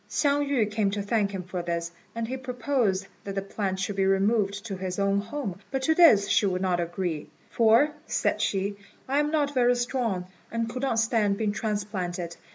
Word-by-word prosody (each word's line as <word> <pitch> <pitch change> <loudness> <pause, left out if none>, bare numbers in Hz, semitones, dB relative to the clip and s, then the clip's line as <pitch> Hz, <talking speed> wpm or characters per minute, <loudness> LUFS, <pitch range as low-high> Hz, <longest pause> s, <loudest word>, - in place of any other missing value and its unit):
Hsiang 285 -1 +1
yü 230 -7 +1
came 210 -2 +1
to 205 +1 -2
thank 205 -1 +1
him 190 -2 -5
for 180 0 -4
this, 170 0 -3 0.2
and 230 -1 -2
he 255 - -3
proposed 250 -6 0 0.2
that 195 -1 -5
the 195 - 0
plant 195 -1 -3
should 200 +1 -2
be 195 - +3
removed 200 +1 +1
to 200 -4 -4
his 185 -1 -4
own 200 0 +2
home; 205 -4 -4
but 270 -1 -2
to 320 - +4
this 290 - +6
she 205 - +3
would 185 0 -1
not 180 -2 +1
agree, 170 -2 -3 0.2
"for," 230 +6 +5 0.2
said - - 0
she, 200 +1 0 0.3
"I 275 +2 +2
am 295 0 +1
not 295 -2 +1
very 245 -2 +4
strong, 240 -6 -1 0.3
and 230 0 -1
could 250 +2 -5
not 265 -4 0
stand 220 -3 +2
being 215 -1 0
transplanted. 195 -5 -3
205 Hz, 200 wpm, -27 LUFS, 190-245 Hz, 0.3 s, this